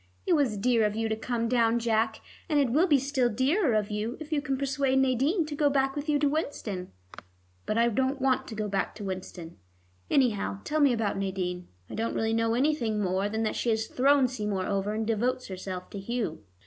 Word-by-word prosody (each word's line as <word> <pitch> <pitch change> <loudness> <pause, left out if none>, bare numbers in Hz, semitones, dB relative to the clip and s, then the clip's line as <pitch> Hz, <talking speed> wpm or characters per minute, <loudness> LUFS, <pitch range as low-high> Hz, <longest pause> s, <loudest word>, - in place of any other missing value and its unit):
It 360 - +3
was 275 -9 +2
dear 230 +2 +2
of 210 0 +1
you 225 0 0
to 220 - 0
come 230 +1 -2
down, 230 -1 +3
Jack, 225 -1 0 0.3
and 300 -2 +3
it 270 -4 +2
will 320 +9 +4
be 295 -5 +5
still 270 -2 +1
dearer 260 - +2
of 210 -1 0
you 215 +4 -3
if 310 0 -9
you 300 -2 +1
can 270 -2 -2
persuade 275 -1 0
Nadine 265 - +2
to 300 - -6
go 290 0 +3
back 270 -1 +1
with 290 +1 -4
you 295 - +3
to 290 0 +2
Winston." 235 - -3 0.8
"But 215 - 0
I 235 0 +4
don't 265 +4 0
want 265 0 +1
to 225 - -7
go 215 0 -2
back 195 -1 -2
to 210 - -8
Winston. 185 -3 -6 0.5
Anyhow, 210 -6 +1
tell 310 +1 -1
me 285 -3 +5
about 220 -4 -1
Nadine. 180 -2 -3 0.2
I - - -10
don't 225 +1 -2
really 225 0 0
know 230 0 +1
anything 245 -5 +1
more 190 +1 0
than 220 +1 -1
that 215 - -1
she 240 - -1
has 220 0 +1
thrown 270 +2 +3
Seymour 210 -6 -2
over, 200 +2 -1
and 220 0 -1
devotes 240 +3 -1
herself 185 -1 -6
to 200 - -6
Hugh." 215 -5 -3
230 Hz, 220 wpm, -28 LUFS, 210-270 Hz, 0.8 s, be